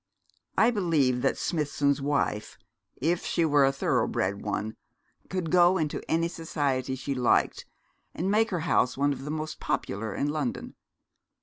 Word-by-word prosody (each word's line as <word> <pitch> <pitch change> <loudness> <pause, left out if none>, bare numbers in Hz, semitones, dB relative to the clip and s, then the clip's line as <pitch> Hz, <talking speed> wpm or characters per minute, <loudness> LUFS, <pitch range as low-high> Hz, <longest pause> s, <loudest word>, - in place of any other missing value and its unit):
I 225 +5 +5
believe 155 - +1
that - - +1
Smithson's 145 -3 0
wife, 140 -7 -1 0.4
if 170 +5 0
she 170 - +1
were 145 -2 +4
a 135 - +3
thorough 135 - +1
bred 100 +2 -1
one, 105 +1 -3 0.5
could 180 -4 -2
go 180 +1 +5
into 155 -4 -2
any 165 +1 +2
society 140 -6 -2
she 135 +2 -3
liked, 125 -2 +1 0.5
and 185 +4 -1
make 225 +2 +3
her 180 -6 -2
house 155 -6 +1
one 145 +1 +2
of 135 0 -8
the - - -5
most 155 0 -4
popular 105 +1 -2
in 145 - 0
London. 145 -4 -3
145 Hz, 160 wpm, -27 LUFS, 130-170 Hz, 0.5 s, I